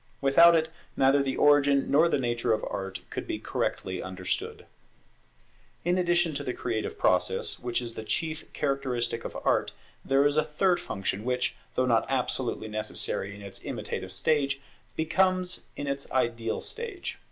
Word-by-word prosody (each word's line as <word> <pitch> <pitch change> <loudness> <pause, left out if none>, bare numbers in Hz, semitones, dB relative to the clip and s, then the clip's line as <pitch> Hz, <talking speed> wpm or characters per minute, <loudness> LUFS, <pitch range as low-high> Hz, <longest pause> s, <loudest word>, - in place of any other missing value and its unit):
Without 170 +5 +7
it 160 0 +2 0.3
neither 135 +1 +5
the 135 -1 -1
origin 145 -1 +4
nor 160 +4 +5
the - - +2
nature 120 -2 +1
of 110 - -1
Art 95 0 -4
could - - -4
be - - -2
correctly 95 -1 -2
understood. 95 0 -4 1.2
In 175 +1 +3
addition 175 -2 +2
to - - -3
the 125 - -3
creative 115 -3 -3
process, - - +1
which 120 0 -1
is 115 -1 -4
the 110 - -5
chief 160 +6 -2
characteristic 125 -5 -1
of - - -5
Art, - - +2 0.3
there 135 +1 +3
is 145 +1 +3
a 155 - +5
third 175 +4 +1
function 100 +1 -3
which, 125 +1 0 0.2
though 130 - +2
not 115 -3 +2
absolutely 125 -3 -1
necessary 105 -2 -2
in 100 - -11
its 100 - -8
imitative 95 - -4
stage, 140 +6 +1 0.4
becomes 185 +3 +1
in 145 - -4
its 140 0 -3
ideal 115 -3 0
stage. 440 -6 -5
135 Hz, 160 wpm, -28 LUFS, 115-155 Hz, 1.2 s, Without